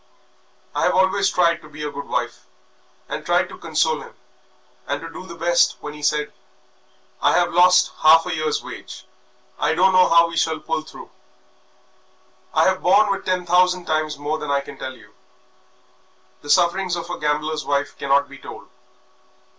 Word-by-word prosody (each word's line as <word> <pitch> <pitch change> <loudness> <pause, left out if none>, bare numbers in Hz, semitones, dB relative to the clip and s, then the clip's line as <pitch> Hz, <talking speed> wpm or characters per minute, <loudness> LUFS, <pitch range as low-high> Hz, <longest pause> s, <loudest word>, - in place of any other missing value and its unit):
I - - 0
have - - +2
always 190 +1 +2
tried 170 -2 +1
to 155 - -15
be 150 0 -9
a 150 - -4
good 140 0 -8
wife - - -4 0.6
and - - -5
tried - - +1
to - - -11
console - - 0
him, - - -13 0.7
and 140 0 -2
to 165 - -8
do 185 - -10
the 170 - -9
best 170 +1 +2
when 150 - -7
he 150 - -11
said, 150 0 0 0.9
'I - - +3
have 175 -1 +1
lost 180 +1 +5
half 160 +1 +6
a 180 - -3
year's 155 -2 -2
wages, - - -10 0.6
I 150 +2 +1
don't 190 +3 +4
know 185 0 +5
how 170 0 +5
we 165 0 -7
shall 160 -1 0
pull 160 0 -3
through.' 155 - -13 1.4
I - - +3
have 190 0 +1
borne 200 +3 +4
with 195 - -3
ten 185 -1 -1
thousand 180 0 +2
times 155 -1 -1
more 150 +2 -3
than 150 - -6
I 140 0 +1
can 140 0 -12
tell 130 0 -6
you. - - -19 1.3
The 145 - -12
sufferings 180 +2 +2
of 170 -1 -6
a - - -5
gambler's 150 +1 -1
wife 145 0 -2
cannot 140 +1 +2
be 140 0 -13
told. - - -11
165 Hz, 180 wpm, -21 LUFS, 150-180 Hz, 1.4 s, half